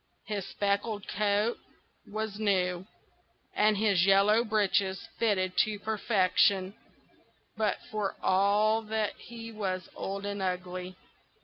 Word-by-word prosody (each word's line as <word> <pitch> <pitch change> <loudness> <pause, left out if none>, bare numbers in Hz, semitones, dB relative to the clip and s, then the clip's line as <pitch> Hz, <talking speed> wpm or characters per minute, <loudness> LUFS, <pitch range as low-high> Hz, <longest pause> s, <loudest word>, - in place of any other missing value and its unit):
His 200 -2 -4
speckled 205 +1 -1
coat 210 +3 0 0.5
was 215 0 -4
new, 185 -3 0 0.7
and 210 0 +3
his 200 -4 +3
yellow 200 +4 +5
breeches 200 -3 0
fitted 185 -5 +1
to 215 -1 +2
perfection; 200 -2 +2 0.8
but 215 -2 0
for 210 -2 -2
all 205 +3 +3
that 220 -1 -2
he 230 -1 -9
was 190 -4 -3
old 195 +1 -4
and 200 -1 -3
ugly. 180 0 -3
205 Hz, 110 wpm, -29 LUFS, 190-215 Hz, 0.8 s, yellow